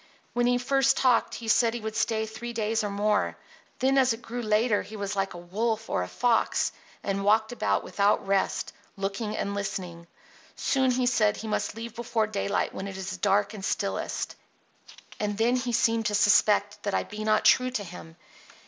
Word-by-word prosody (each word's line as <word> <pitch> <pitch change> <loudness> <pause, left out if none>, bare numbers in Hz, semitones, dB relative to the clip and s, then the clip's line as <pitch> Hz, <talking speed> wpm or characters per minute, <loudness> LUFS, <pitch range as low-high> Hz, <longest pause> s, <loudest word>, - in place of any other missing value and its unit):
When 245 0 +2
he 245 0 +3
first 270 +2 +2
talked 255 -3 +3
he 230 - -7
said 230 +1 +3
he - - -3
would 220 -1 -5
stay 220 -1 0
three 235 +2 -7
days 225 0 0
or 205 - -1
more. 205 +1 0 0.4
Then 270 +1 +3
as 260 -2 +4
it 225 - -9
grew 240 +1 -5
later 215 0 +2
he 210 +3 -10
was 205 0 -3
like 195 -2 -1
a 175 0 -10
wolf 225 +1 -1
or - - +1
a 90 - -3
fox, 235 - +1 0.3
and 195 0 -1
walked 220 +2 +3
about 245 - 0
without 200 0 +1
rest, 195 0 0 0.2
looking 200 +2 -3
and 200 - -2
listening. 180 -4 -5 0.5
Soon 265 -1 +1
he 250 0 +1
said 215 -4 +2
he 220 - -6
must 215 - -2
leave 230 0 -7
before 230 -2 0
daylight 205 -1 -1
when 190 - -5
it 195 -1 -7
is 190 0 -5
dark 200 +2 +2
and 205 -3 -8
stillest. - - -2 0.8
And 205 -1 -2
then 235 +3 +3
he 250 -1 -1
seemed 225 -1 +2
to 210 - 0
suspect 205 0 +3
that 205 -1 -2
I - - +1
be 210 +1 -7
not 215 0 +2
true 255 0 +5
to 240 -5 -3
him. 170 -3 -10
215 Hz, 195 wpm, -27 LUFS, 200-235 Hz, 0.8 s, true